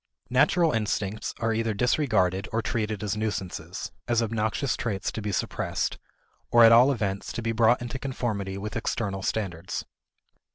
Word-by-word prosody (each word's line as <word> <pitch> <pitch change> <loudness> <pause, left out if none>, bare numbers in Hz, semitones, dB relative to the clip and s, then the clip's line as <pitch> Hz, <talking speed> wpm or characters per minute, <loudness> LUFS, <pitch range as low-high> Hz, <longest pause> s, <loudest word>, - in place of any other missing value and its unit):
Natural 160 +6 +4
instincts 105 -2 -1
are 115 -1 0
either 115 -1 0
disregarded 100 -6 +2
or 115 0 0
treated 110 -2 -2
as 105 -1 -1
nuisances 105 -4 -4 0.2
as 120 -1 +2
obnoxious 110 +4 0
traits 105 -5 -2
to 110 - -5
be 105 0 -2
suppressed, 95 - -2 0.5
or 120 0 +7
at 115 - +9
all 125 +4 +7
events 100 -6 -2
to 120 - -4
be 115 - 0
brought 115 +2 +3
into 120 +2 -5
conformity 105 -8 -3
with 105 +2 -5
external 100 -3 -2
standards. 90 -5 -3
110 Hz, 155 wpm, -27 LUFS, 100-120 Hz, 0.5 s, at